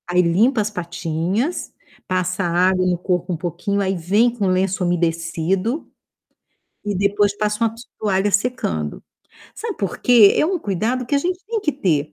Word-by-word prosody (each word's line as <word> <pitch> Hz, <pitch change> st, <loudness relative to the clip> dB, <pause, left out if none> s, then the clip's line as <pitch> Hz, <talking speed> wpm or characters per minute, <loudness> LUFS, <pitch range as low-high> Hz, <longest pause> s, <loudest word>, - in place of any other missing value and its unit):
Aí 180 Hz, +1 st, +4 dB
limpa 215 Hz, +8 st, +3 dB
as 210 Hz, -, -1 dB
patinhas, 180 Hz, -, -2 dB, 0.3 s
passa 185 Hz, +1 st, -1 dB
água 185 Hz, +2 st, +2 dB
no 180 Hz, -1 st, +1 dB
corpo 180 Hz, 0 st, -1 dB
um -, -, -3 dB
pouquinho, 180 Hz, +4 st, -2 dB
aí 190 Hz, 0 st, 0 dB
vem 200 Hz, +8 st, +2 dB
com 210 Hz, -5 st, -1 dB
lenço 185 Hz, 0 st, +1 dB
umedecido, 175 Hz, -, -1 dB, 1.0 s
e 205 Hz, -1 st, -1 dB
depois 200 Hz, +1 st, +1 dB
passa 210 Hz, +2 st, 0 dB
uma 225 Hz, -1 st, 0 dB
to 230 Hz, -, -11 dB, 0.2 s
toalha 200 Hz, -1 st, +1 dB
secando. 195 Hz, -, -1 dB, 0.5 s
Sabe 445 Hz, -4 st, -5 dB
por 195 Hz, -3 st, -3 dB
quê? 230 Hz, -5 st, +6 dB
É -, -, +3 dB
um 360 Hz, +3 st, 0 dB
cuidado 230 Hz, -, -2 dB
que 260 Hz, -, -1 dB
a -, -, +4 dB
gente 360 Hz, +5 st, -2 dB
tem 450 Hz, 0 st, -2 dB
que 315 Hz, -, 0 dB
ter, 155 Hz, -, 0 dB
195 Hz, 170 wpm, -20 LUFS, 175-225 Hz, 1.0 s, quê